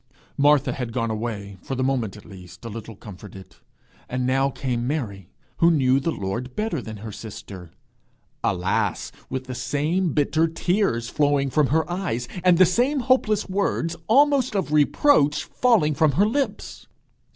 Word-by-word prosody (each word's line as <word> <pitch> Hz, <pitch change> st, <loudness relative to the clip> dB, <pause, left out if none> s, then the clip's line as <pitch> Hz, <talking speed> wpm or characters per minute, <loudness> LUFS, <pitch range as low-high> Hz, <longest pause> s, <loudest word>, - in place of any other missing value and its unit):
Martha 145 Hz, -1 st, +3 dB
had 125 Hz, -3 st, -4 dB
gone 115 Hz, -2 st, -1 dB
away, 105 Hz, -3 st, -5 dB
for 135 Hz, -, -5 dB
the 130 Hz, -, -1 dB
moment 125 Hz, -7 st, -1 dB
at 105 Hz, -, -14 dB
least, 90 Hz, +1 st, -13 dB
a -, -, -5 dB
little 115 Hz, 0 st, -8 dB
comforted; 95 Hz, -1 st, -12 dB, 0.5 s
and 125 Hz, 0 st, -2 dB
now 135 Hz, +2 st, +2 dB
came 125 Hz, -2 st, -3 dB
Mary, 105 Hz, -, -4 dB, 0.3 s
who 170 Hz, -, +5 dB
knew 135 Hz, -5 st, +3 dB
the 155 Hz, -, -2 dB
Lord 120 Hz, +1 st, -4 dB
better 210 Hz, -, -2 dB
than 110 Hz, -2 st, -8 dB
her 110 Hz, +2 st, -8 dB
sister 95 Hz, -4 st, -9 dB, 0.7 s
alas, 90 Hz, -1 st, -1 dB, 0.2 s
with 130 Hz, 0 st, -3 dB
the 130 Hz, 0 st, -7 dB
same 155 Hz, +6 st, -1 dB
bitter 155 Hz, +3 st, +2 dB
tears 165 Hz, -, 0 dB
flowing 145 Hz, -1 st, +1 dB
from 150 Hz, -1 st, +3 dB
her 160 Hz, +2 st, +1 dB
eyes, 175 Hz, -10 st, -3 dB, 0.2 s
and 180 Hz, -2 st, +5 dB
the 185 Hz, -, +7 dB
same 250 Hz, -, +1 dB
hopeless 235 Hz, -5 st, +2 dB
words, 185 Hz, -4 st, -1 dB
almost 270 Hz, -1 st, +3 dB
of 185 Hz, -6 st, -1 dB
reproach, 150 Hz, -, +3 dB
falling 215 Hz, -12 st, +2 dB
from 150 Hz, 0 st, +2 dB
her 195 Hz, +9 st, +3 dB
lips! 270 Hz, +6 st, -3 dB
140 Hz, 160 wpm, -23 LUFS, 115-175 Hz, 0.7 s, the